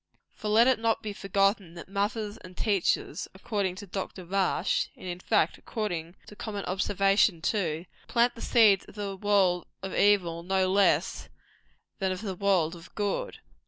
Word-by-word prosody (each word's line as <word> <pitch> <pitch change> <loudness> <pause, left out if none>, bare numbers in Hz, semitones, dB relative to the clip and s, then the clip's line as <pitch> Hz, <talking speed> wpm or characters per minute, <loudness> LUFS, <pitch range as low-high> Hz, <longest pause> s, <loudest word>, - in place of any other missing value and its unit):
For 215 - -7
let 220 +3 +5
it 255 -2 +3
not 225 0 0
be 210 -1 -4
forgotten 195 -2 0
that 170 - -9
mothers 205 +2 -2
and 180 0 -13
teachers, 200 -5 0
according 195 -2 -2
to 205 - -8
Dr. 190 -1 -6
Rush 190 +1 0
and, - - -12
in 175 -1 -4
fact, 165 -2 +1
according 175 -6 -4
to 210 - -12
common 205 -2 -5
observation, 195 0 +2
too 170 -3 -1 0.2
plant 240 0 +3
the 230 - -11
seeds 215 -5 +5
of - - -15
the 200 -2 -4
world 190 -3 +2 0.2
of 190 - -4
evil 180 -5 +3
no 185 +1 +1
less 200 0 +2 0.7
than 190 -1 0
of 185 - -4
the 200 -4 -3
world 180 -3 +1
of 170 0 -14
good. 210 - -2
195 Hz, 165 wpm, -28 LUFS, 180-210 Hz, 0.7 s, let